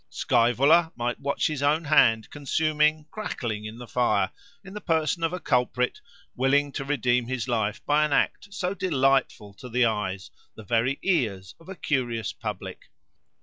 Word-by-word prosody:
Scaevola 140 +8 +3
might 120 0 -2
watch 140 0 -1
his 150 -3 -1
own 150 +3 +2
hand, 115 -7 +3
consuming, 150 +1 +1
crackling, 115 - -4
in 110 +1 -7
the 120 - -9
fire, 105 -6 +1 0.3
in 195 0 -11
the 210 - -7
person 165 -1 0
of 165 - +1
a 180 - -4
culprit, 125 -3 0 0.3
willing 140 +3 +2
to 135 - -4
redeem 125 -4 0
his 125 -2 -3
life 110 -4 -1
by 150 +1 +3
an 150 - 0
act 200 +7 0
so 190 -2 -2
delightful 135 - 0
to 125 +5 -11
the 125 +1 +2
eyes, 105 -4 -2 0.2
the 110 - -10
very 115 +6 0
ears, 110 - 0
of 165 - -16
a 190 - -6
curious 120 - -2
public. - - -7
135 Hz, 165 wpm, -26 LUFS, 115-155 Hz, 0.3 s, Scaevola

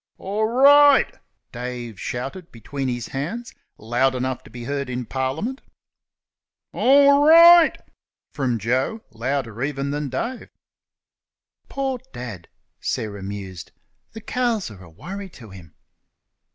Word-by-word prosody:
"Or 215 +3 -2
right!" 285 0 +6 0.4
Dave 120 -3 -6
shouted 135 +9 -6
between 135 +4 -5
his 120 -2 -4
hands, 180 - -5 0.2
loud 120 +4 0
enough 130 0 -2
to - - -13
be 120 -1 -9
heard 140 +1 -3
in 125 0 -4
Parliament. 135 - -3 1.1
"Or 280 +2 +5
right!" 335 +1 +8 0.6
from 130 -5 -1
Joe, 130 - -1
louder 120 -1 -3
even 140 0 -2
than 145 -1 -3
Dave. 230 - -4 1.2
"Poor 270 -2 -2
Dad!" 110 -9 -8 0.3
Sarah 100 -2 -4
mused, 95 -3 -8 0.4
"the 220 - -9
cows 235 - -1
are 95 -3 -13
a 90 - -14
worry 190 - -8
to 115 - -14
him." 85 -4 -14
135 Hz, 120 wpm, -22 LUFS, -, 1.2 s, right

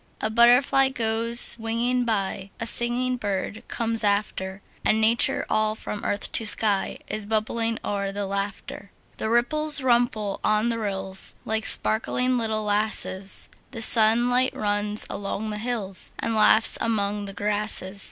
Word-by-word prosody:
A 215 - -2
butterfly 250 +4 +4
goes 230 -1 0
winging 240 +2 -1
by; 195 -3 -2
A 230 - -3
singing 245 +2 0
bird 205 -1 -4
comes 225 -1 0
after; 200 -2 -2 0.2
And 220 - +2
Nature, 225 +2 +2
all 215 0 +1
from 210 -1 -7
earth 205 - -2
to - - 0
sky, 210 -2 +2
Is 215 -1 -5
bubbling 225 +1 -1
o'er 200 -1 -2
with 195 +1 -6
laughter. 200 0 -5 0.3
The 220 - -3
ripples 295 +6 +1
wimple 235 -5 +1
on 215 +2 +2
the 230 -1 -2
rills, 195 -2 -2
Like 220 0 -2
sparkling 250 +3 +1
little 220 -1 -2
lasses; 205 -2 -1 0.2
The 230 -4 -7
sunlight 240 +4 +4
runs 205 0 0
along 205 +2 -5
the 210 - -5
hills, 215 -5 0
And 230 - -2
laughs 215 +1 +4
among 205 -2 -1
the 195 - -8
grasses. 205 -1 0
220 Hz, 140 wpm, -24 LUFS, 205-235 Hz, 0.3 s, butterfly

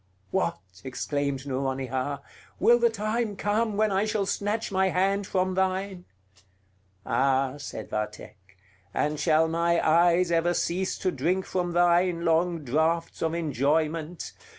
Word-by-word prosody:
"What!" 85 -1 0 0.3
exclaimed 140 +1 -3
Nouronihar; 135 0 -2 0.4
"will 240 +1 +5
the 235 0 +4
time 215 0 -2
come 210 +1 0
when 215 -1 +2
I 195 +2 +1
shall 215 -2 0
snatch 205 +2 -2
my 190 0 +2
hand 195 +3 +1
from 185 0 0
thine?" 190 0 -1 1.0
"Ah," 135 0 +1
said 110 -6 -7
Vathek; 105 -2 -6 0.4
"and 150 0 0
shall 160 +1 +3
my 170 +1 +1
eyes 170 +2 +4
ever 170 +1 +2
cease 185 +4 -1
to 185 - -1
drink 175 +6 0
from 175 -2 -2
thine 175 0 +3
long 165 0 +1
draughts 160 +5 0
of 165 0 0
enjoyment! 155 +2 -1
170 Hz, 130 wpm, -27 LUFS, 145-190 Hz, 1.0 s, will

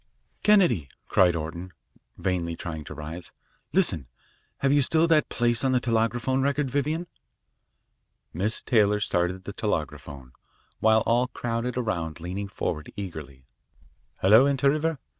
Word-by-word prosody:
"Kennedy," 175 - +3 0.2
cried 90 -2 +4
Orton, 85 +3 -6 0.4
vainly 85 -3 -2
trying 80 -2 -6
to 75 - -8
rise, 80 +4 -8 0.4
"listen. 95 - +2 0.5
Have 135 0 +3
you 145 - +4
still 160 +4 +3
that 155 -3 +3
place 120 0 +1
on 130 -1 +2
the 125 - +3
telegraphone 120 +2 0
record, 140 -1 0
Vivian?" 150 +5 -1 1.3
Miss 100 +7 -1
Taylor 105 -4 +3
started 90 -2 -1
the 100 - -7
telegraphone, 75 - -4 0.5
while 110 0 +4
we - - +1
all 120 +2 +3
crowded 120 0 -3
around 85 -10 -2
leaning 95 +4 -5
forward 75 -5 -4
eagerly. 80 -10 -8 0.8
"Hello. 110 +8 +6
Inter 140 0 +3
River? 155 +1 -1
110 Hz, 135 wpm, -26 LUFS, 85-130 Hz, 1.3 s, Hello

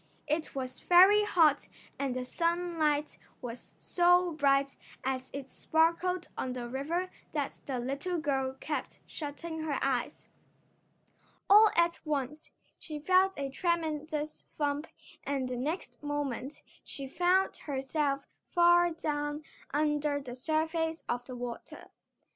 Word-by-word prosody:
It 310 0 -2
was 255 -1 -4
very 390 +4 +7
hot 320 -8 +4 0.3
and 275 -3 -1
the 255 0 -3
sunlight 335 -2 0 0.2
was 240 -1 -8
so 355 0 +3
bright 275 -2 +2 0.3
as 260 0 -2
it 275 -1 -7
sparkled 335 +3 +1
on 255 - -3
the 245 -1 -5
river 320 +9 -2 0.2
that 290 -3 -2
the 265 -3 -2
little 280 +9 -2
girl 270 -4 -1
kept 300 - -4
shutting 320 +2 -6
her 300 -3 -1
eyes. 265 +1 -1 1.2
All 420 +2 +8
at 340 0 +3
once 300 0 -3 0.3
she 305 -2 -6
felt 370 +5 +3
a 275 -1 -3
tremendous 310 -2 -2
thump 290 +1 -1 0.4
and 275 -2 -1
the 255 - -3
next 300 +9 -4
moment 290 -2 -3 0.2
she 275 -1 -6
found 360 +6 +2
herself 275 0 -1 0.2
far 345 0 +5
down 295 -2 -3 0.3
under 295 0 +1
the 255 -3 -8
surface 320 +4 -1
of 245 0 -2
the 255 - -7
water. 245 -1 -7
295 Hz, 125 wpm, -31 LUFS, 275-335 Hz, 1.2 s, All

